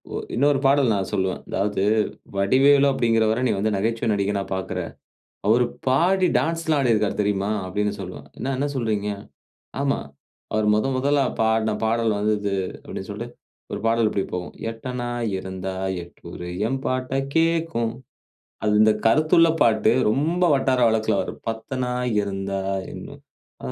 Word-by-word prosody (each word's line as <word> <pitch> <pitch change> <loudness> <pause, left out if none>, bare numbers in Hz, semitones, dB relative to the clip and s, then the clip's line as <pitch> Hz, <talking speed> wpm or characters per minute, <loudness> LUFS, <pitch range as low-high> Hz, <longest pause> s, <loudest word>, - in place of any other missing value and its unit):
ஒ - - -1 0.2
இன்னொரு 140 +3 +3
பாடல் 135 -3 +4
நான் 95 -1 -2
சொல்லுவேன். 95 -2 -1
அதாவது 100 0 0 0.5
"வடிவேலு 135 +8 +5
அப்பிடீங்கிறவர, 115 -3 +2
நீ - - +2
வந்து 110 +2 0
நகைச்சுவை 115 +3 -1
நடிகனா 100 0 0
பாக்குற. 95 -1 -3 0.7
அவரு 120 +3 +4 0.2
பாடி 180 +8 +3
டான்ஸ்லாம் 165 -2 0
ஆடிருக்காரு 110 -3 +2
தெரியுமா?" 100 -1 0 0.2
அப்பிடீன்னு 105 +2 -2
சொல்வேன். 90 -6 -8
"என்ன, 135 +2 -2
என்ன 140 +2 0
சொல்கிறீங்க?". 110 -5 -1 0.7
"ஆமா. 140 -1 +1 0.6
அவரு 110 -1 +2
முதன் 130 +5 0
முதலா 140 +1 +2 0.2
பாடுன 110 0 +2
பாடல் 115 -1 +1
வந்து 105 +1 +1
இது" 100 -1 -1 0.3
அப்பிடீன்னு - - -7
சொல்லிட்டு - - -7 0.4
ஒரு - - -3
பாடல் 115 0 +3
இப்பிடி 100 -2 -1
போகும். 90 -1 -5 0.2
"எட்டனா 120 +1 -5 0.3
இருந்தா 95 0 -5 0.3
எட்டூரு 85 0 -10 0.2
எம்பாட்ட 130 0 -2 0.2
கேட்கும்" 165 -8 +1 0.7
அது 105 - +2
இந்த 110 0 +6
கருத்துள்ள 155 +7 +5
பாட்டு. 110 -2 +4 0.2
ரொம்ப 160 +9 +1
வட்டார 130 -2 +1
வழக்குல 110 -1 +1
வரும். - - -7
"பத்தனா 125 +2 -3 0.3
இருந்தா 95 -1 -3 0.3
இன்னும் - - -10 0.4
அ - - -4
115 Hz, 135 wpm, -23 LUFS, 100-135 Hz, 0.7 s, இந்த